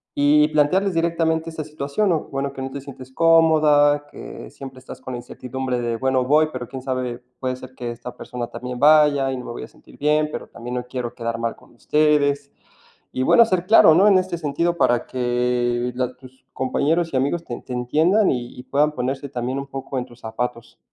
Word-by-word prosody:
y 150 +1 +4
plantearles 180 +6 +2
directamente 165 -1 0
esa 160 -1 -5
situación, 150 +6 -2
¿no? 165 -3 +2
Bueno, 140 0 -3
que 135 - -7
no 135 - -5
te 140 +1 -6
sientes 130 -2 -11
cómoda, 155 -3 +4
que - - -9
siempre 135 -1 -10
estás 130 - -11
con 130 - -7
la - - -3
incertidumbre 125 +1 -4
de: 120 -1 -2
"Bueno, 130 +1 +1
voy, 155 +3 +3
pero 125 -1 -5
quién 130 +2 -7
sabe, 130 -2 -3 0.2
puede 130 -1 -2
ser 130 0 -12
que 120 -2 -5
esta 120 +1 -9
persona 120 -1 -5
también 125 0 -7
vaya 145 -2 +5
y 130 - -3
no 125 - -7
me - - -6
voy 120 - -7
a - - -8
sentir - - -19
bien, 150 +1 +2
pero - - -6
también 120 +1 -8
no 125 0 -3
quiero 125 -2 -4
quedar 115 -1 -3
mal 115 0 -2
con - - -22
ustedes". 145 0 +1 0.6
Y 130 - -2
bueno, 235 - +6
ser 185 -5 0
claro, 185 -6 +7
¿no? 195 +5 +5
En 195 -2 +6
este 185 -2 -2
sentido, 170 +3 -1
para 120 -7 +2
que 125 -1 0
la 125 0 -2
tus 130 0 -17
compañeros 160 +6 0
y - - +2
amigos 140 +6 0
ten 120 - -7
te - - -9
entiendan 160 - +2
y 120 -1 -5
y - - -7
puedan 145 +3 +2
ponerse 135 +1 -3
también 125 +1 -3
un 140 - -5
poco 135 0 -5
en 125 - -2
tus 120 - -17
zapatos. 115 +1 -5
135 Hz, 210 wpm, -22 LUFS, 125-155 Hz, 0.6 s, claro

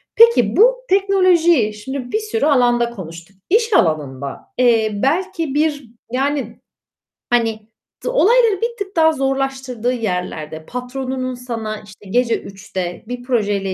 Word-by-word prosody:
Peki, 445 - +5
bu - - +6
teknolojiyi 360 - +3
şimdi 250 +4 -6
bir 435 - +1
sürü 435 -4 -2
alanda 240 -4 +3
konuştuk. 180 -3 -10
İş 450 +2 +2
alanında, 140 - 0 0.2
eee, 230 -3 +3
belki 315 - -1
bir, 295 -2 0 0.3
yani, 270 -2 -2 0.7
hani, 225 -2 0 0.4
d - - 0
olayları 465 -3 +3
bir 470 0 -2
tık 395 -2 -6
daha 320 -1 +5
zorlaştırdığı 265 -3 -1
yerlerde, 180 -8 -4
patronunun 255 +1 -4
sana 225 -4 -5
işte 205 -1 -15
gece 240 +1 +1
3'te 190 -2 -6
bir 245 0 -6
projeyle 205 -6 0
250 Hz, 125 wpm, -19 LUFS, 210-320 Hz, 0.7 s, bu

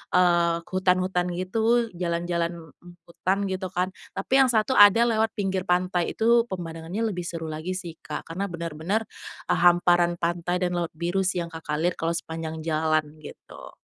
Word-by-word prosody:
eee 170 -2 +3
,hutan-hutan 185 -1 +1
gitu 225 +6 +1
jalan-jalan, 170 0 -1 0.2
mmm, 175 +3 -16 0.2
hutan 185 +3 -1
gitu 190 0 -3
kan, 180 +1 0 0.2
tapi - - -6
yang 270 - +6
1 220 +4 +2
ada 205 +2 +8
lewat 220 0 +1
pinggir 190 -2 -2
pantai. 180 -1 0
Itu 235 +1 +3
pemandangannya 175 0 -5
lebih 180 -3 -4
seru 165 -2 -5
lagi 155 +4 -4
sih, 170 -3 -7
Kak, 150 +1 -7
karena 190 +4 -3
benar-benar, 170 +4 -3 0.4
eee, - - +3
hamparan 175 0 +4
pantai 175 +1 -1
dan 175 -1 0
laut 170 -2 -3
biru 175 +4 -1
sih 185 -1 0
yang 170 - -5
Kakak 160 -2 -4
lihat 175 +1 +1
kalau 165 +1 -1
sepanjang 160 -1 -5
jalan, 155 0 +1 0.2
gitu. - - -12
175 Hz, 165 wpm, -25 LUFS, 170-190 Hz, 0.4 s, ada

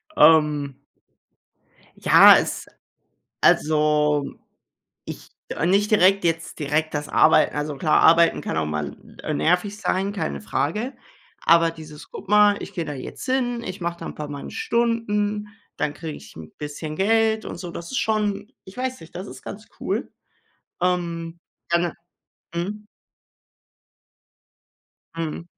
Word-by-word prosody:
Ähm. 150 -4 +4 1.2
Ja, - - +8
es - - -2 0.8
Also, 150 -1 +3 0.8
ich - - -9 0.3
ah, 160 - -1
nicht 200 +4 +2
direkt 195 -1 +4
jetzt 165 -1 -1
direkt 150 +2 -1
das 145 0 -3
Arbeiten. - - +4
Also, 150 0 -3
klar, 155 +2 +3
Arbeiten 165 +1 +5
kann - - -3
auch 80 - 0
mal, 75 -2 -4 0.3
äh, 155 - -3
nervig 180 +7 +1
sein, 195 -1 -1
keine 70 - -3
Frage. 165 - -2 0.5
Aber 165 0 +5
dieses: 155 -2 -12
„Guck 195 - -10
mal, 210 0 +5
ich - - -9
gehe 170 - -3
da 150 - -5
jetzt 130 -2 -8
hin, 250 -2 0
ich 185 -2 -6
mache 170 0 -3
da - - -7
'n - - -7
paar 150 - -6
meine 145 -1 -7
Stunden, 230 - -1 0.3
dann 145 - -1
kriege 160 -1 -7
ich 105 - -14
'n 80 -1 -10
bisschen 150 +1 -6
Geld 220 +3 +2
und - - -6
so“, 175 0 -7
das 170 0 -8
ist 260 - -2
schon 210 0 -1
ich 190 - -13
weiß 255 0 -3
nicht, 165 - -14
das 185 +3 -6
ist - - -11
ganz 215 +2 -9
cool. - - -2 0.7
Ähm, 170 -2 -2 0.3
dann, 170 0 +2 0.7
äh 170 - -2
Mhm. 210 +4 -5 2.3
Mhm. 165 0 -4
170 Hz, 145 wpm, -23 LUFS, 150-205 Hz, 2.3 s, Ja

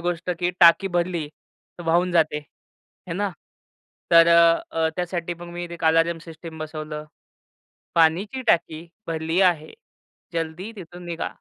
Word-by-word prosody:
गोष्ट 175 +1 -2
की 175 0 +1
टाकी 175 +3 +7
भरली 170 -3 -1 0.5
तर - - -6
वाहून 175 +2 +2
जाते, 155 -3 +2
आहे 155 +3 -15
ना. 205 0 -1 0.8
तर 165 0 +8
अ, 170 0 +6
अ, 160 0 +1
त्यासाठी 175 -1 -3
मग 175 +1 -10
मी 175 0 -5
एक 165 - -7
अलार्म 165 +1 +3
सिस्टम 165 -1 -10
बसवलं. 155 -1 -6 0.9
पाण्याची 175 +10 +2
टाकी 165 -3 +1 0.2
भरली 165 +2 -1
आहे, 175 -5 +2 0.6
जल्दी 165 +5 -4
तिथून 175 -1 -10
निघा. 170 -1 -3
170 Hz, 135 wpm, -23 LUFS, 160-175 Hz, 0.9 s, तर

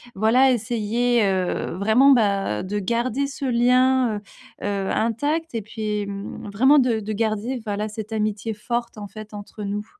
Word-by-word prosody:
voilà 235 +6 +4
essayer, 235 0 +1
heu, 185 -3 -1
vraiment 220 +8 +5
bah, 200 - +2
de 205 +2 -2
garder 235 +6 -1
ce 280 0 -6
lien, 250 -1 +3
heu - - -8 0.4
heu, 200 -1 -1
intact 290 +9 -1
et 230 - -2
puis, 210 -1 -3
mmh, 200 +1 -7
vraiment 260 +8 +5
de 245 -4 +2
de 215 +1 -4
garder 225 +3 -1
voilà 210 0 -2
cette 215 +1 -7
amitié 215 0 -1
forte 235 +2 -3
en 205 -1 -6
fait 215 +1 -11
entre 205 +1 -8
nous. 205 +1 -3
220 Hz, 160 wpm, -23 LUFS, 205-245 Hz, 0.4 s, vraiment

